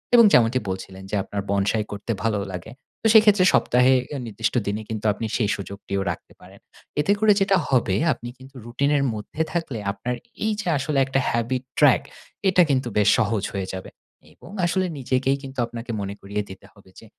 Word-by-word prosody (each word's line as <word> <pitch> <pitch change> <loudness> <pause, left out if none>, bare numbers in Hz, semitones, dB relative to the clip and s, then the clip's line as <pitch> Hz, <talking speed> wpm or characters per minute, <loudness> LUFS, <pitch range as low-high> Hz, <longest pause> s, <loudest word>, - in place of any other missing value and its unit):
এবং 235 -1 +8
যেমনটি 120 +2 +4
বলছিলেন 95 0 -6
যে - - 0
আপনার 100 - -4
বনসাই 100 +2 +1
করতে 105 +3 -4
ভালো 110 -3 +1
লাগে। 90 +4 -7 0.3
তো - - -14
সেইক্ষেত্রে 210 -4 +6
সপ্তাহে 125 +2 +4 0.3
নির্দিষ্ট 110 0 -2
দিনে 105 +2 -2
কিন্তু 110 -1 -5
আপনি 110 - -5
সেই 105 -4 0
সুযোগটিও 100 0 -5
রাখতে - - -10
পারেন। - - -15 0.4
এতে 195 - +2
করে 220 0 +5
যেটা 195 0 +4
হবে, 120 -8 +2 0.2
আপনি 120 - -9
কিন্তু 130 +1 -15
রুটিন 135 +5 0
এর 140 - +1
মধ্যে 110 +8 -5
থাকলে 165 -9 -2
আপনার 110 +5 -4 0.3
এই 220 - +1
যে - - -8
আসলে 140 +1 -2
একটা 135 0 0
habit 120 +2 -1 0.2
track 145 -4 +6 0.5
এটা 180 -1 +5
কিন্তু 130 -3 +1
বেশ 105 - +4
সহজ 110 -3 0
হয়ে 95 -2 -3
যাবে, 95 - -6 0.4
এবং - - -15
আসলে 185 +2 +1
নিজেকেই 130 +1 0
কিন্তু 135 -1 -8
আপনাকে 115 +1 -7
মনে 100 0 -4
করিয়ে 100 +1 -3
দিতে 95 0 -11
হবে 100 -2 -20
যে - - -15
120 Hz, 185 wpm, -23 LUFS, 100-135 Hz, 0.5 s, এবং